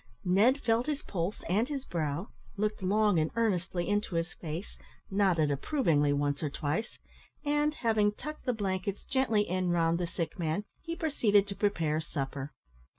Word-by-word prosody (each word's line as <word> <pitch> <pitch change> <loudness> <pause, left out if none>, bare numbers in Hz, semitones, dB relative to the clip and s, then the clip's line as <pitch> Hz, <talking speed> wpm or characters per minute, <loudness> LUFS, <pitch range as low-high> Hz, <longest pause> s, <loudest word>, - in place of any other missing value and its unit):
Ned 210 +10 +4
felt 230 -1 +1
his 300 -1 -2
pulse 180 +2 -3
and 215 - +2
his 275 -2 -3
brow, 160 +2 -2 0.3
looked 210 0 -1
long 205 -1 +3
and 155 0 +1
earnestly 185 -6 0
into 205 -3 0
his 165 +1 -1
face, 165 +4 -6 0.4
nodded 185 -7 +3
approvingly 150 - +2
once 145 0 0
or 150 - 0
twice, 150 +10 -2 0.5
and, 295 +1 +2
having 220 -5 +2
tucked 305 +8 -8
the 250 - +2
blankets 195 -2 -2
gently 225 -6 +1
in 185 0 0
round 170 -1 +2
the 175 - -1
sick 170 +1 -4
man, 165 +4 0 0.2
he 335 0 -4
proceeded 220 -12 +3
to 200 -1 -6
prepare 165 -6 +1
supper. 140 -2 -4
195 Hz, 160 wpm, -31 LUFS, 165-220 Hz, 0.5 s, Ned